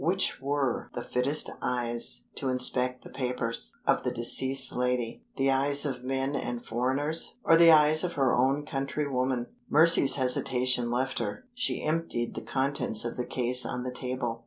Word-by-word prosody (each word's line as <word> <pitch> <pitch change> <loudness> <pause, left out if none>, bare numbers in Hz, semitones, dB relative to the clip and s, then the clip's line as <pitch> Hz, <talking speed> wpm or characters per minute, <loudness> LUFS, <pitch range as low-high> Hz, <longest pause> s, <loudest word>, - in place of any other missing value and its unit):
Which 185 -2 0
were 140 -2 -2
the 120 - -4
fittest 135 +6 0
eyes 120 -1 0
to 135 - -3
inspect 125 0 +1
the - - -13
papers 125 -3 -4
of - - +2
the 125 - -1
deceased 130 +2 +4
lady 125 -2 -2
the 135 0 +1
eyes 140 +2 +1
of 125 -3 -4
men 135 +2 -2
and 120 -3 -5
foreigners, 135 +7 -2
or 165 - +5
the 165 0 +7
eyes 155 +1 +5
of 175 -1 -3
her 135 -3 +1
own 135 +4 0
countrywoman? 135 -3 -2 0.2
Mercy's 160 -2 +5
hesitation 125 -2 +1
left 130 +2 -2
her. 105 - -5
She 245 -1 -2
emptied 155 -7 -2
the - - -6
contents 135 -5 -1
of 120 - -4
the 125 - -5
case 125 0 +3
on 125 - -4
the 125 0 -5
table. 125 -2 -4
130 Hz, 165 wpm, -27 LUFS, 125-140 Hz, 0.2 s, the